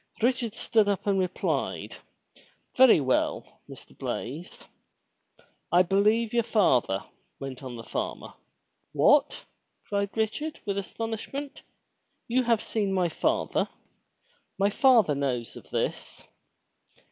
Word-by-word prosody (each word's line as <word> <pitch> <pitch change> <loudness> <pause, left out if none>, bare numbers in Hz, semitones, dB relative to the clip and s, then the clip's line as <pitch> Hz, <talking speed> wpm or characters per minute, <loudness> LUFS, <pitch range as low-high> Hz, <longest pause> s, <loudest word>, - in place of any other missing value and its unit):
Richard 240 -3 +1
stood 215 -3 +2
up 200 -3 -1
and 200 -2 +2
replied, 185 -1 -2 0.8
"Very 260 -8 +7
well, 130 -2 -1
Mr. - - -12
Blaize." 150 +9 -6 1.1
"I 175 +2 +6
believe 210 +5 +2
yer 235 - +3
father," 130 - +2 0.4
went 135 -1 -7
on 130 -3 -7
the 115 - -8
farmer, - - -5 0.3
— - - -49
"What!" - - +3 0.4
cried 200 +1 -2
Richard, 260 +9 -2
with 200 -1 -1
astonishment. 225 +7 -5 0.7
"You 250 +2 +2
have 235 -3 +1
seen 205 -3 -1
my 180 -2 +1
father! - - 0 0.9
My 200 +1 +2
father 230 - +5
knows 130 -5 -2
of - - -12
this?" - - -3
200 Hz, 115 wpm, -27 LUFS, 165-230 Hz, 1.1 s, Very